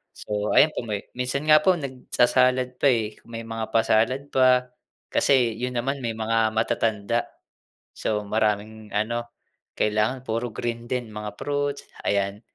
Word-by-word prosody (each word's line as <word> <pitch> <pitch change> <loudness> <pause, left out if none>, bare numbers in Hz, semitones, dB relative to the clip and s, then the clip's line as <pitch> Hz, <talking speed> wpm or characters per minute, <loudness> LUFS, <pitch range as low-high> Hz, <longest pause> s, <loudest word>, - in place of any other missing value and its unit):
So 105 0 -2
ayan 155 - +6
po, - - -1
may 105 -2 -4
minsan 130 +3 -2
nga 155 0 +8
po 185 +1 +5
nagsa-salad 130 -2 +1
pa, - - +5
eh. 110 -3 -1
May 115 0 -6
mga 115 -1 -4
pa-salad 115 +5 +2
pa, 130 -1 +4 0.4
kasi 125 -4 +3
yun 125 +1 -3
naman 135 +4 -1
may 115 -1 -1
mga 110 0 +1
matatanda. 110 0 0 0.7
So 105 -1 -1
maraming 110 0 -1
ano, 115 +3 -1 0.5
kailangan 110 +5 +1
puro 115 +2 -1
green 115 +2 -4
din, 125 -3 -2
mga 105 -1 -5
fruits, 145 0 -2 0.2
ayan. 100 +1 0
115 Hz, 145 wpm, -25 LUFS, 110-130 Hz, 0.7 s, nga